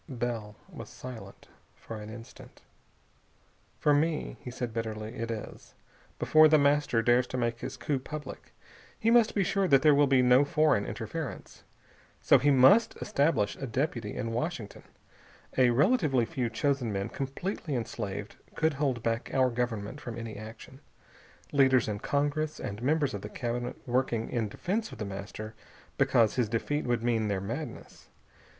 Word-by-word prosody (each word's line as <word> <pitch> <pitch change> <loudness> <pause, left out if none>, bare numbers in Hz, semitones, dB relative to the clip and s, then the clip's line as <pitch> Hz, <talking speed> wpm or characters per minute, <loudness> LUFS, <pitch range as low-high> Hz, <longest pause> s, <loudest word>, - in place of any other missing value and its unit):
Bell 120 -5 -4
was - - -10
silent 125 -3 -10 0.3
for 115 - -8
an 105 0 -8
instant. 115 +1 -12 1.1
"For 150 - +3
me," 155 +2 0
he - - -7
said 120 -2 -5
bitterly, 110 -1 -4
"it 115 0 -4
is. 110 -2 -7 0.4
Before 155 0 +6
The 155 0 +5
Master 140 -5 +2
dares 120 +1 +3
to 130 - -4
make 120 -1 -1
his - - -6
coup 145 -3 -1
public, 145 +1 -8 0.5
he 225 - +2
must 235 -2 +4
be 200 - +3
sure 195 +1 +1
that 135 -4 +5
there 150 -1 +7
will 145 0 +4
be 130 -2 +4
no 125 +2 +6
foreign 150 -7 +2
interference. - - -6 0.6
So, - - +5
he 145 +4 +3
must 145 - +6
establish 145 - +1
a 135 - -5
deputy 120 -4 -2
in 115 - -3
Washington. 120 - -4 0.7
A 130 -2 +5
relatively 145 - +3
few 125 -3 -2
chosen 130 0 0
men, 100 -1 -2
completely 145 +3 -4
enslaved, 105 -3 -5 0.2
could 160 -1 +1
hold 135 -5 -1
back 115 0 -1
our 130 -1 +3
Government 120 +1 -3
from 115 -2 -6
any 115 -1 -6
action. 110 +5 -10 0.7
Leaders 130 -3 +4
in 105 -1 -3
Congress, 145 +4 -1
and 100 +2 -5
members 145 0 +1
of 100 - -4
the 105 - -7
Cabinet, 120 +1 -3
working, 120 -2 0
in 115 -4 -1
defense 210 - -3
of - - -9
The 110 - -4
Master 100 +2 -7 0.5
because 115 -3 +4
his 120 -4 +1
defeat 145 +6 -1
would 120 -2 0
mean 115 -3 +1
their 100 -2 -1
madness.... 115 +11 -7
125 Hz, 160 wpm, -29 LUFS, 115-145 Hz, 1.1 s, there